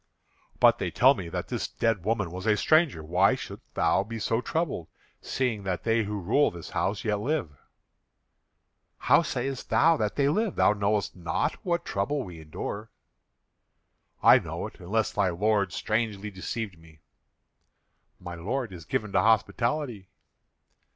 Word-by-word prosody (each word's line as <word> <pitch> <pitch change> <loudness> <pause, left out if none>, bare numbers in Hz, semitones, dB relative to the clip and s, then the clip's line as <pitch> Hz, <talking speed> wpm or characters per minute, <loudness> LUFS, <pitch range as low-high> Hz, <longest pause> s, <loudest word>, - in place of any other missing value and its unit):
"But - - +5
they - - -1
tell 130 +3 +5
me 90 -10 -6
that - - -4
this - - -2
dead 115 -6 -1
woman 105 -4 -1
was 95 +4 -6
a 105 -1 +4
stranger. 155 - +3
Why 90 +5 +3
shouldst - - -10
thou 95 - +2
be 115 +2 -6
so 115 +2 0
troubled, 150 - -2 0.3
seeing 125 -6 -1
that 95 -2 -3
they 115 -1 +2
who 105 0 -3
rule 110 +11 +3
this 85 -2 -10
house 100 +2 -1
yet 105 -2 0
live?" 135 - -1 1.5
"How - - +4
sayest 135 -1 -3
thou 165 +1 +4
that 105 -4 -1
they 140 -1 +2
live? 205 +7 0
Thou - - +4
knowest 105 0 0
not 85 -3 -1
what 175 -1 -1
trouble 130 +9 -1
we 85 -5 -10
endure." 100 +7 -6 1.3
"I - - +8
know - - -5
it, - - -10
unless 105 +5 -1
thy 100 -3 +1
lord 100 +2 +1
strangely 105 0 -2
deceived 95 -1 -5
me." 80 -2 -19 1.2
"My 90 -1 -7
lord 105 +6 -3
is 85 -3 -10
given 105 +4 -2
to - - +3
hospitality." 115 0 0
105 Hz, 155 wpm, -27 LUFS, 95-120 Hz, 1.5 s, I